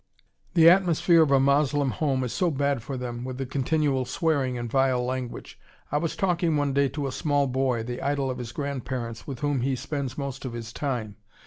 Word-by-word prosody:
The 165 -1 +7
atmosphere 175 -2 +5
of 155 - +4
a 135 -1 +5
Moslem 140 0 +2
home 135 -3 0
is 125 - -3
so 180 - +1
bad 140 -3 0
for 130 +3 -5
them, 120 -1 -5
with 130 0 -5
the 135 - -3
continual 135 +1 0
swearing 135 -1 0
and 120 0 -4
vile 130 0 +2
language. 130 -1 -5 0.3
I 145 - +2
was 165 +1 -2
talking 170 -4 +1
one 145 -1 0
day 140 0 +3
to 145 +1 -4
a 135 - -2
small 145 -1 +1
boy, 130 -3 0
the 125 +2 -5
idol 140 -2 0
of 125 - -6
his 120 -2 -6
grandparents, 125 -5 -4
with 135 -4 -6
whom 145 -3 0
he 135 +1 0
spends 135 0 -4
most 140 -2 -4
of 130 -3 -5
his 115 -1 -7
time. 120 -8 -3
135 Hz, 210 wpm, -26 LUFS, 125-145 Hz, 0.3 s, The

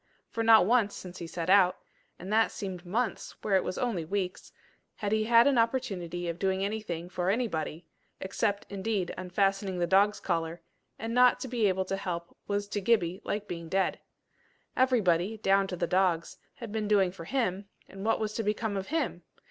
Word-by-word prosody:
For 230 - -2
not 225 -4 +7
once 220 -2 +2
since 180 0 -9
he 170 - -6
set 165 0 -4
out 185 -1 +5 0.4
and 190 +4 -5
that 225 +1 +4
seemed 185 -3 -6
months 225 +6 -2
where 200 - +2
it 190 - +3
was - - -4
only 230 -9 -1
weeks, 185 +2 -3 0.4
had 205 -1 -3
he 215 0 +2
had 235 +1 +6
an 275 -4 +4
opportunity 195 -8 -1
of 170 0 -4
doing 190 0 +1
anything 200 -5 -4
for 180 0 -2
anybody 175 -7 -2 0.3
except, 200 +1 -1
indeed, 200 -2 -2
unfastening 195 +1 0
the 175 - +1
dog's 200 +3 +3
collar; 165 -1 -2 0.3
and 225 +2 -4
not 250 0 +5
to - - -4
be 235 -4 +1
able 190 0 0
to 195 +1 -2
help 170 -3 -5
was 205 0 -1
to 205 - -2
Gibbie 190 -4 +1
like 210 0 -3
being 170 -2 -6
dead. 195 +2 0 0.8
Everybody, 220 -6 +2
down 195 -1 +3
to 185 - -4
the 175 - -1
dogs, 180 -2 +1 0.2
had 230 -4 -8
been 215 -1 -2
doing 195 -3 +3
for 170 -3 -10
him, 200 -5 -1 0.2
and 195 0 -9
what 225 +1 +2
was 215 -1 -2
to 225 - -2
become 210 0 -1
of 195 -1 -3
him! 305 - -1
195 Hz, 190 wpm, -29 LUFS, 180-220 Hz, 0.8 s, not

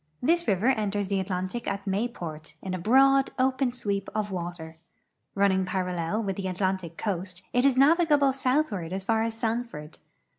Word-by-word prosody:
This 340 +6 +1
river 200 +5 +2
enters 205 -5 0
the 200 -1 +1
Atlantic 185 +5 -3
at 200 0 -3
Mayport, 175 -8 -4
in 190 - -4
a 185 - -2
broad, 270 +7 +4
open 260 0 +2
sweep 205 -5 -3
of 210 -1 -1
water. 170 -3 -6 0.6
Running 195 -1 +3
parallel 185 +2 -2
with 195 -2 -3
the 195 -1 -3
Atlantic 185 -2 -2
coast, 185 -2 -4
it 245 +2 +4
is 265 -2 +2
navigable 295 -1 +4
southward 255 - 0
as 190 0 -3
far 220 +2 +1
as 225 0 -1
Sanford. 225 -9 -4
200 Hz, 160 wpm, -27 LUFS, 185-245 Hz, 0.6 s, broad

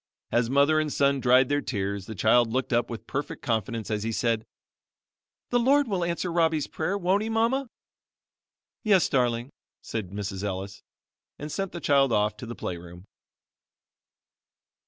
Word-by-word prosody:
As 120 -1 +2
mother 140 +3 +4
and 155 -1 -1
son 140 0 +2
dried 130 0 +5
their 145 +1 +1
tears, 100 -5 -3
the 110 - -6
child 115 +3 +3
looked 130 +2 -1
up 120 +1 +1
with 115 - -7
perfect 145 +1 -4
confidence 115 -1 -2
as 105 -1 -1
he 115 +2 -2
said, 115 -1 0 1.0
"The 245 - +3
Lord 275 +3 +4
will 190 -5 -1
answer 170 +1 -2
Robbie's 160 -3 +2
prayer, 185 +5 -2
won't 190 +2 +1
he. 220 - -3
Mama?" 230 +4 +1 1.1
"Yes 200 -5 +4
darling," 120 -1 0 0.3
said 110 -5 -4
Mrs. 100 0 -5
Ellis; 100 0 -4 0.6
and 150 +1 -6
sent 195 +2 -3
the 170 - -6
child 140 -4 +3
off 105 -1 +2
to 120 - -8
the 120 - -6
play 90 - -4
room. 90 +2 -12
130 Hz, 160 wpm, -26 LUFS, 110-170 Hz, 1.1 s, dried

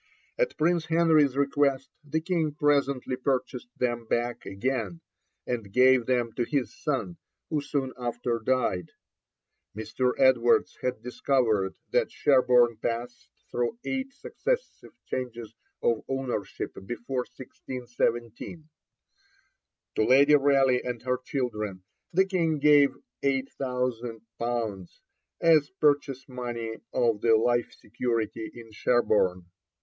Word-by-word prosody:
At - - 0
Prince 170 +1 +1
Henry's 160 -5 +4
request 140 -1 +1
the 155 +2 -2
King 160 -3 -1
presently 140 -3 +1
purchased 125 -1 -2
them 120 -2 -1
back 120 +1 -1
again, 100 -4 -2 0.4
and 115 -5 -3
gave 125 +1 +5
them 120 -3 +1
to 120 - +2
his 125 -4 -1
son, 150 +4 -2 0.3
who 150 -2 +1
soon 140 -2 -2
after 120 -1 -2
died. 115 -9 0 0.8
Mr. 125 +3 -1
Edwards 130 -3 +3
has 125 0 -1
discovered 115 -4 0 0.2
that - - +2
Sherborne 125 -4 +4
passed 120 +2 -4 0.2
through 120 - -1
eight 270 0 -2
successive 475 - -3 0.2
changes 120 -3 -5 0.3
of 115 -2 +1
ownership 135 -5 -3
before 120 +3 -3
1617. 125 +3 -4 1.2
To - - +1
Lady 140 +5 +6
Raleigh 135 -3 +4
and 120 -1 -3
her 125 0 0
children 105 -9 -3 0.3
the 190 +3 +4
King 170 -5 0
gave 145 -2 +5 0.3
8,000_l._ 120 -6 -2 0.5
as 155 -3 +5
purchase 145 -3 +1
money 120 -3 -5
of 115 -4 +1
the 115 -1 +5
life 120 +2 +1
security 115 -1 -3
in 115 -2 -11
Sherborne. 105 -5 +1
125 Hz, 110 wpm, -27 LUFS, 115-140 Hz, 1.2 s, Lady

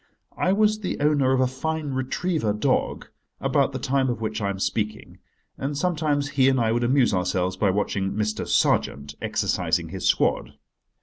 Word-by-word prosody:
I 185 - +1
was 215 +1 +2
the 195 - -4
owner 145 -3 +2
of 130 -1 +2
a - - +4
fine 150 +3 -3
retriever 130 - -1
dog 105 - 0 0.3
about - - +1
the - - -4
time 135 0 0
of 120 - -2
which 110 -1 -3
I 100 - 0
am 100 - -3
speaking, 105 +2 -3 0.4
and 140 +1 -3
sometimes 150 -4 0
he 135 -2 +3
and 130 -1 +2
I 115 -1 +2
would 120 +1 0
amuse 125 -1 +3
ourselves 90 0 0
by 100 +1 +1
watching 95 0 -1
Mr. 105 0 -2
Sergeant 70 0 +1
exercising - - 0
his - - -3
squad. - - +1
130 Hz, 175 wpm, -24 LUFS, 105-145 Hz, 0.4 s, a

